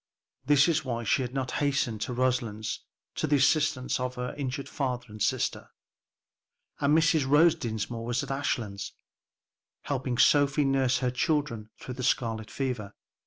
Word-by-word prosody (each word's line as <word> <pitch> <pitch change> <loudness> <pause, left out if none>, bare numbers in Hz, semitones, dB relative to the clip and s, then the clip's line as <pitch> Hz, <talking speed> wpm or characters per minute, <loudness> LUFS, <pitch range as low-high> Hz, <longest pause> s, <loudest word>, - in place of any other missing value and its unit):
This 145 -1 +6
was 155 -2 +1
why 120 -3 -3
she 115 - +2
had 125 -1 -3
not 130 -1 -3
hastened 135 -6 0
to - - -2
Roselands 120 -4 -1 0.3
to - - -2
the 145 - +3
assistance 145 -2 +2
of 125 0 -3
her 125 0 -4
injured 140 -1 -4
father 125 -4 -3
and 105 0 -10
sister. - - 0 1.1
And 145 +2 +4
Mrs. 155 -3 +3
Rose 155 +3 +6
Dinsmore 115 0 -4
was 120 +3 -1
at 140 - -5
Ashlands, 115 -7 -2 0.9
helping 130 -3 -2
Sophie 145 +1 +4
nurse 135 -2 +2
her 125 - +1
children 125 -4 -1
through 130 - -7
the 125 +1 -6
scarlet 115 -3 0
fever. 125 -7 -4
130 Hz, 155 wpm, -28 LUFS, 120-140 Hz, 1.1 s, This